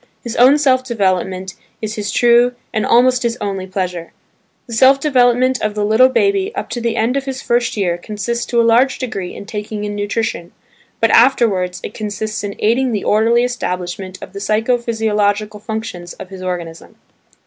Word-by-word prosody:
His 235 Hz, -, -5 dB
own 260 Hz, +4 st, +6 dB
self 260 Hz, -3 st, +2 dB
development 190 Hz, -5 st, -1 dB, 0.3 s
is 215 Hz, -1 st, -4 dB
his 210 Hz, -1 st, -4 dB
true 240 Hz, +2 st, +4 dB, 0.2 s
and 215 Hz, -, 0 dB
almost 250 Hz, +1 st, +4 dB
his 235 Hz, 0 st, -1 dB
only 195 Hz, -2 st, -4 dB
pleasure. 180 Hz, -3 st, -4 dB, 0.5 s
The 235 Hz, -, -9 dB
self 265 Hz, +4 st, +5 dB
development 255 Hz, -2 st, +2 dB
of 215 Hz, 0 st, -2 dB
the 210 Hz, -1 st, 0 dB
little 220 Hz, +5 st, +5 dB
baby 395 Hz, +7 st, +1 dB
up -, -, -5 dB
to 240 Hz, -, -3 dB
the 230 Hz, -1 st, -1 dB
end 235 Hz, +4 st, +1 dB
of 275 Hz, -, -3 dB
his 265 Hz, -1 st, -5 dB
first 240 Hz, -1 st, 0 dB
year 175 Hz, -4 st, 0 dB
consists 215 Hz, +5 st, -4 dB
to 240 Hz, -, +1 dB
a -, -, +5 dB
large 240 Hz, +4 st, +3 dB
degree 195 Hz, -8 st, -5 dB
in -, -, -9 dB
taking 210 Hz, 0 st, -5 dB
in 205 Hz, 0 st, -3 dB
nutrition; 205 Hz, -4 st, -3 dB, 0.5 s
but 225 Hz, -1 st, +3 dB
afterwards 195 Hz, -8 st, +3 dB
it -, -, -6 dB
consists 215 Hz, 0 st, -4 dB
in 200 Hz, -1 st, -4 dB
aiding 240 Hz, +3 st, +1 dB
the 205 Hz, -, -2 dB
orderly 230 Hz, +3 st, +3 dB
establishment 185 Hz, -6 st, -4 dB
of -, -, -11 dB
the 200 Hz, -, -6 dB
psycho 220 Hz, +4 st, +1 dB
physiological 215 Hz, -2 st, -1 dB
functions 210 Hz, -5 st, -6 dB
of 185 Hz, -, -10 dB
his 190 Hz, -1 st, -9 dB
organism. 175 Hz, -3 st, -6 dB
220 Hz, 180 wpm, -17 LUFS, 200-245 Hz, 0.5 s, own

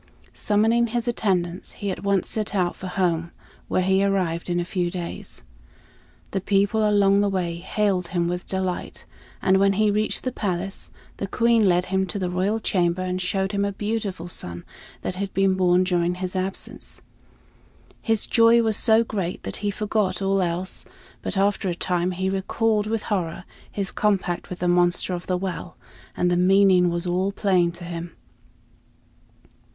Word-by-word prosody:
Summoning 225 Hz, +3 st, +2 dB
his 240 Hz, +1 st, -2 dB
attendants, 185 Hz, -6 st, -1 dB
he 200 Hz, -2 st, -3 dB
at -, -, -5 dB
once 200 Hz, -2 st, +1 dB
set 210 Hz, -2 st, -2 dB
out 180 Hz, -2 st, +1 dB
for 190 Hz, -, -7 dB
home, 170 Hz, -3 st, 0 dB, 0.4 s
where 185 Hz, -, +1 dB
he 190 Hz, +1 st, +3 dB
arrived 180 Hz, -4 st, 0 dB
in 175 Hz, 0 st, +1 dB
a 175 Hz, -, -1 dB
few 180 Hz, -1 st, -1 dB
days. 175 Hz, -1 st, -6 dB, 0.9 s
The 195 Hz, -, -1 dB
people 205 Hz, +3 st, +2 dB
along 200 Hz, -1 st, +4 dB
the 205 Hz, -, +2 dB
way 175 Hz, -3 st, -2 dB
hailed 190 Hz, 0 st, 0 dB
him 170 Hz, -1 st, 0 dB
with 180 Hz, +1 st, -3 dB
delight; 190 Hz, -1 st, -3 dB, 0.4 s
and 190 Hz, 0 st, +4 dB
when 195 Hz, 0 st, +4 dB
he 210 Hz, +1 st, +2 dB
reached 215 Hz, +1 st, -1 dB
the 255 Hz, -, -1 dB
palace, 195 Hz, -3 st, -3 dB, 0.3 s
the 195 Hz, -, -3 dB
Queen 230 Hz, 0 st, +3 dB
led 180 Hz, 0 st, +2 dB
him 190 Hz, 0 st, +2 dB
to 185 Hz, -, -4 dB
the 180 Hz, -2 st, -2 dB
royal 195 Hz, +5 st, 0 dB
chamber 180 Hz, -3 st, 0 dB
and 185 Hz, 0 st, -2 dB
showed 190 Hz, +1 st, -1 dB
him 200 Hz, -1 st, 0 dB
a 200 Hz, -, 0 dB
beautiful 205 Hz, -4 st, -3 dB
son 85 Hz, -, -6 dB, 0.4 s
that -, -, -2 dB
had 195 Hz, 0 st, -3 dB
been 195 Hz, -1 st, +3 dB
born 180 Hz, -1 st, +3 dB
during 175 Hz, -1 st, +1 dB
his 185 Hz, +1 st, -4 dB
absence. 185 Hz, +1 st, -5 dB, 1.0 s
His 225 Hz, -2 st, +1 dB
joy 230 Hz, 0 st, +5 dB
was 220 Hz, -1 st, +1 dB
so 225 Hz, -1 st, +5 dB
great 195 Hz, -6 st, -4 dB
that -, -, -4 dB
he 205 Hz, -, -2 dB
forgot 210 Hz, -1 st, -1 dB
all 195 Hz, 0 st, +1 dB
else; 180 Hz, +1 st, -2 dB, 0.4 s
but -, -, -3 dB
after 200 Hz, 0 st, +1 dB
a 175 Hz, -, -2 dB
time 180 Hz, 0 st, 0 dB
he 185 Hz, +1 st, -2 dB
recalled 210 Hz, +3 st, 0 dB
with 220 Hz, -1 st, -1 dB
horror 185 Hz, -3 st, -2 dB, 0.3 s
his 195 Hz, -2 st, -3 dB
compact 195 Hz, -4 st, 0 dB
with 180 Hz, -, -5 dB
the 180 Hz, -, -1 dB
monster 175 Hz, +1 st, +2 dB
of 175 Hz, 0 st, -5 dB
the 185 Hz, -, +1 dB
well, 180 Hz, -1 st, -5 dB, 0.4 s
and 180 Hz, 0 st, +2 dB
the -, -, +3 dB
meaning 185 Hz, -1 st, +5 dB
was 170 Hz, +1 st, -2 dB
all 185 Hz, +2 st, 0 dB
plain 185 Hz, -4 st, +2 dB
to 175 Hz, +1 st, -10 dB
him. 170 Hz, -1 st, -6 dB
190 Hz, 175 wpm, -24 LUFS, 180-205 Hz, 1.0 s, joy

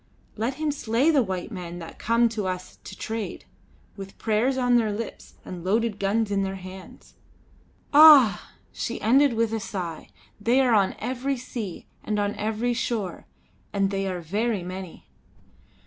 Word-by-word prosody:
Let 230 Hz, +5 st, -2 dB
him 305 Hz, +1 st, -1 dB
slay 265 Hz, +2 st, +1 dB
the 290 Hz, -4 st, +4 dB
white 190 Hz, -2 st, -4 dB
men 175 Hz, -4 st, -6 dB
that 165 Hz, -2 st, -10 dB
come 235 Hz, +1 st, +3 dB
to 215 Hz, -4 st, -3 dB
us 185 Hz, 0 st, -5 dB
to 190 Hz, -, -9 dB
trade, 220 Hz, -2 st, -5 dB, 0.5 s
with 195 Hz, -1 st, -9 dB
prayers 230 Hz, +5 st, +1 dB
on 245 Hz, -1 st, +3 dB
their 220 Hz, -3 st, +1 dB
lips 215 Hz, +2 st, -7 dB
and 175 Hz, -2 st, -7 dB
loaded 215 Hz, +2 st, 0 dB
guns 205 Hz, +2 st, 0 dB
in 200 Hz, -1 st, +1 dB
their 195 Hz, 0 st, -2 dB
hands. 185 Hz, 0 st, -11 dB, 0.8 s
Ah!" 285 Hz, -, +8 dB, 0.2 s
she 235 Hz, -, -4 dB
ended 265 Hz, +4 st, +4 dB
with 225 Hz, 0 st, 0 dB
a 225 Hz, -, 0 dB
sigh 175 Hz, -6 st, -5 dB, 0.3 s
"they 235 Hz, +5 st, +3 dB
are 255 Hz, -3 st, +3 dB
on 200 Hz, -3 st, +3 dB
every 260 Hz, +4 st, -2 dB
sea, 235 Hz, -7 st, -6 dB, 0.2 s
and 210 Hz, -, -2 dB
on 205 Hz, 0 st, 0 dB
every 220 Hz, +3 st, -1 dB
shore; 230 Hz, -5 st, -3 dB, 0.5 s
and 195 Hz, -1 st, +1 dB
they 195 Hz, 0 st, -1 dB
are 180 Hz, -2 st, -3 dB
very 205 Hz, +4 st, -1 dB
many!" 185 Hz, -1 st, -8 dB
215 Hz, 165 wpm, -25 LUFS, 190-240 Hz, 0.8 s, Ah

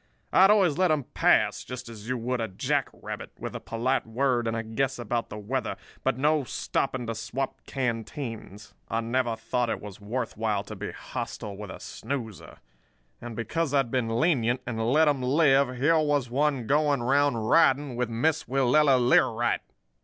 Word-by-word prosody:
I -, -, +6 dB
had 190 Hz, -, +8 dB
always 190 Hz, -7 st, +4 dB
let 185 Hz, -1 st, +4 dB
'em 155 Hz, -3 st, +1 dB
pass, -, -, +3 dB
just 125 Hz, -1 st, -7 dB
as 115 Hz, -1 st, -9 dB
you 130 Hz, -, 0 dB
would 120 Hz, +1 st, -2 dB
a 115 Hz, -, -1 dB
jack 95 Hz, -, -1 dB
rabbit; -, -, -7 dB
with -, -, -6 dB
a -, -, -3 dB
polite 120 Hz, +2 st, -1 dB
word 120 Hz, 0 st, +1 dB
and 115 Hz, 0 st, -1 dB
a 115 Hz, -, -2 dB
guess 130 Hz, +4 st, -1 dB
about 120 Hz, 0 st, -2 dB
the -, -, -7 dB
weather, 125 Hz, +5 st, -2 dB, 0.3 s
but -, -, +1 dB
no 150 Hz, +2 st, +2 dB
stopping 130 Hz, 0 st, -2 dB
to 115 Hz, -, -2 dB
swap 115 Hz, +5 st, -4 dB
canteens. 115 Hz, -4 st, -4 dB, 0.2 s
I 115 Hz, -, 0 dB
never 120 Hz, 0 st, 0 dB
thought 115 Hz, +2 st, -1 dB
it -, -, -2 dB
was 105 Hz, -1 st, -10 dB
worth 115 Hz, +4 st, -3 dB
while 105 Hz, -2 st, -1 dB
to -, -, -8 dB
be -, -, -5 dB
hostile 100 Hz, -, -6 dB
with 105 Hz, 0 st, -8 dB
a -, -, -8 dB
snoozer. 115 Hz, -4 st, -6 dB, 0.6 s
And 120 Hz, -2 st, -7 dB
because 145 Hz, +7 st, -1 dB
I'd 135 Hz, -4 st, +2 dB
been 115 Hz, -3 st, 0 dB
lenient, 125 Hz, -6 st, +2 dB
and 115 Hz, -2 st, -3 dB
let 155 Hz, +3 st, +5 dB
'em 145 Hz, -3 st, +2 dB
live, 135 Hz, -1 st, +3 dB
here 160 Hz, +6 st, +3 dB
was 145 Hz, -5 st, 0 dB
one 140 Hz, -2 st, +1 dB
going 145 Hz, 0 st, +2 dB
around 140 Hz, +1 st, +3 dB
riding 135 Hz, +3 st, +3 dB
with 125 Hz, -1 st, -1 dB
Miss 150 Hz, +8 st, 0 dB
Willella 135 Hz, +2 st, +4 dB
Learight! 120 Hz, -1 st, +3 dB
125 Hz, 185 wpm, -27 LUFS, 115-140 Hz, 0.6 s, had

